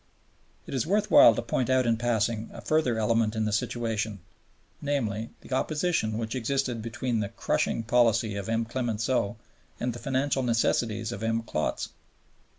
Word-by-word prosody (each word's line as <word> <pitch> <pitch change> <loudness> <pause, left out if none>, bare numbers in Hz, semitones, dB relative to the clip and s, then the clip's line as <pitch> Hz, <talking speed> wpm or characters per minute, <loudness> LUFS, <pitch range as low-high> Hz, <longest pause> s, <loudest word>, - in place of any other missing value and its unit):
It - - -8
is 135 +3 -1
worth 210 +3 +1
while 115 - +8
to - - -2
point 120 +1 -1
out 130 -1 +3
in 115 -1 +3
passing 115 -1 0
a - - -9
further 155 -7 +1
element 110 0 +1
in 110 -1 0
the 105 - 0
situation, 110 -1 -2 0.6
namely, 115 -7 -1
the - - -8
opposition 150 -7 0
which 115 -1 -3
existed 130 -1 -1
between 120 +1 -2
the 100 -2 -2
"crushing" 115 0 -1
policy 115 -2 +2
of 100 +1 -4
M. 115 0 +1
Clemenceau 115 -2 -1 0.4
and 125 0 -1
the 120 - -8
financial 135 0 0
necessities 115 -2 0
of 115 - -6
M. 115 0 0
Klotz. 75 -8 -2
115 Hz, 160 wpm, -27 LUFS, 110-130 Hz, 0.6 s, while